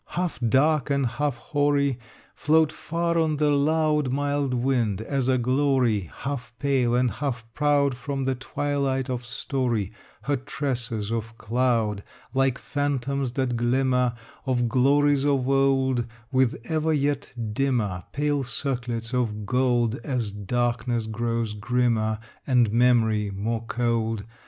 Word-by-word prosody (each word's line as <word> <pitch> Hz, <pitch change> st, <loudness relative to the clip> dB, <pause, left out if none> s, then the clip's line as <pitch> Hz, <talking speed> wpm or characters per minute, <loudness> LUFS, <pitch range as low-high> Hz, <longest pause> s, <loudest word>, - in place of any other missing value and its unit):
Half 180 Hz, -5 st, -1 dB
dark 135 Hz, +4 st, +2 dB
and 140 Hz, -1 st, +1 dB
half 130 Hz, +2 st, -1 dB
hoary, 145 Hz, -2 st, +1 dB, 0.3 s
Float 155 Hz, 0 st, +3 dB
far 170 Hz, +1 st, -1 dB
on 160 Hz, -2 st, +1 dB
the 150 Hz, 0 st, +2 dB
loud 150 Hz, -1 st, +2 dB
Mild 145 Hz, 0 st, 0 dB
wind, 120 Hz, -5 st, +1 dB
as 130 Hz, +3 st, -1 dB
a 130 Hz, -1 st, +3 dB
glory 125 Hz, -, +1 dB
Half 135 Hz, -4 st, -5 dB
pale 130 Hz, -4 st, +1 dB
and 125 Hz, -1 st, +2 dB
half 130 Hz, -6 st, -3 dB
proud 145 Hz, -1 st, +2 dB
From 135 Hz, +1 st, -3 dB
the 135 Hz, -, +1 dB
twilight 135 Hz, 0 st, -2 dB
of 125 Hz, -1 st, -3 dB
story, 120 Hz, -4 st, -2 dB, 0.3 s
Her 145 Hz, 0 st, 0 dB
tresses 125 Hz, -6 st, -3 dB
of 115 Hz, 0 st, -4 dB
cloud; 115 Hz, -3 st, 0 dB, 0.3 s
Like 135 Hz, -1 st, +2 dB
phantoms 140 Hz, -2 st, -2 dB
that 130 Hz, -2 st, 0 dB
glimmer 125 Hz, 0 st, +1 dB, 0.3 s
Of 120 Hz, -2 st, +1 dB
glories 140 Hz, +3 st, +3 dB
of 140 Hz, -3 st, +1 dB
old 135 Hz, -3 st, +2 dB, 0.2 s
With 130 Hz, -2 st, +2 dB
ever 160 Hz, 0 st, 0 dB
yet 145 Hz, -1 st, -1 dB, 0.2 s
dimmer 110 Hz, -9 st, 0 dB
Pale 145 Hz, -1 st, 0 dB
circlets 120 Hz, -2 st, -3 dB
of 110 Hz, -4 st, -1 dB
gold 125 Hz, 0 st, +1 dB
As 125 Hz, -7 st, -2 dB
darkness 120 Hz, +3 st, -1 dB
grows 115 Hz, 0 st, -2 dB
grimmer 110 Hz, 0 st, +1 dB, 0.3 s
And 125 Hz, -5 st, +3 dB
memory 115 Hz, -3 st, +3 dB
more 110 Hz, +4 st, -2 dB
cold. 115 Hz, -3 st, 0 dB
130 Hz, 130 wpm, -25 LUFS, 115-140 Hz, 0.3 s, Float